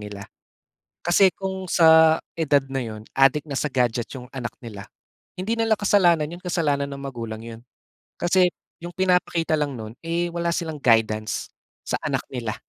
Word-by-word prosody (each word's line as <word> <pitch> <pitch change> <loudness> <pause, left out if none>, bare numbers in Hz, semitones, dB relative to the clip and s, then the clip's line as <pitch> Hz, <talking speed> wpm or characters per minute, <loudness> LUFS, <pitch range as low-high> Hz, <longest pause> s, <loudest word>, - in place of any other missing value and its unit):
nila. 105 -1 -8 0.8
Kasi 180 +2 +5
kung 190 -1 -5
sa 160 -1 +6 0.2
edad 145 -4 +2
na 135 0 -2
yun, 110 -1 -7
adik 135 +3 +3
na 140 - -4
sa 150 - -1
gadget 120 -2 0
'yong 125 -2 -9
anak 120 -4 -5
nila, 105 -5 -9 0.5
hindi 210 +6 -2
nila 225 -1 +2
kasalanan 175 -7 +3
'yon, 175 +2 -9
kasalanan 145 -5 0
ng 140 - -7
magulang 115 -5 -6
'yon. 115 0 -9 0.6
Kasi 180 0 +3 0.3
'yong 175 - -6
pinapakita 180 -3 +1
lang 145 -3 -2
no'n, 110 0 -8
eh, 170 +1 -1
wala 170 0 -1
silang 160 -3 -3
guidance 110 -3 +1 0.4
sa - - 0
anak - - -1
nila. 115 -5 -4
150 Hz, 160 wpm, -23 LUFS, 120-175 Hz, 0.8 s, sa